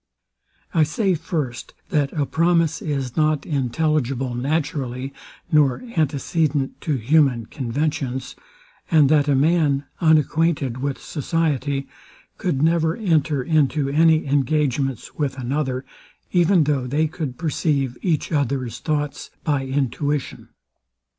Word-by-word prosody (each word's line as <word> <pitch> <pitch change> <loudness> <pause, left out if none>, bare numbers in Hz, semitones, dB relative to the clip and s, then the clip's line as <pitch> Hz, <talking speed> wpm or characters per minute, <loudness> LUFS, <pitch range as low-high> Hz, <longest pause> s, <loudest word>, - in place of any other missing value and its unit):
I 165 - +3
say, 185 +6 +1
first, 150 -7 -4
that 150 -7 +1
a 145 -2 0
promise 165 0 +1
is 135 -5 -3
not 155 -2 +1
intelligible 135 -2 0
naturally, 135 -1 -2 0.4
nor 145 - +3
antecedent 150 -2 0
to 150 - 0
human 130 -1 +2
conventions; 130 0 -3 0.5
and 150 -4 +5
that 150 -1 +4
a 145 - +3
man, 145 -1 +2
unacquainted 155 -4 +2
with 140 0 -2
society, 145 -3 -1 0.5
could 155 -7 0
never 160 0 +2
enter 155 - +1
into 150 -1 +1
any 160 +2 +4
engagements 140 -2 0
with 140 -2 -2
another, 130 0 -2 0.5
even 175 -1 +4
though 140 -4 0
they 150 +5 +1
could 150 -5 -4
perceive 145 -5 0
each 165 -6 0
other's 130 -5 -1
thoughts 150 -2 -2
by 140 -4 0
intuition. 140 +1 -2
145 Hz, 115 wpm, -22 LUFS, 135-160 Hz, 0.5 s, and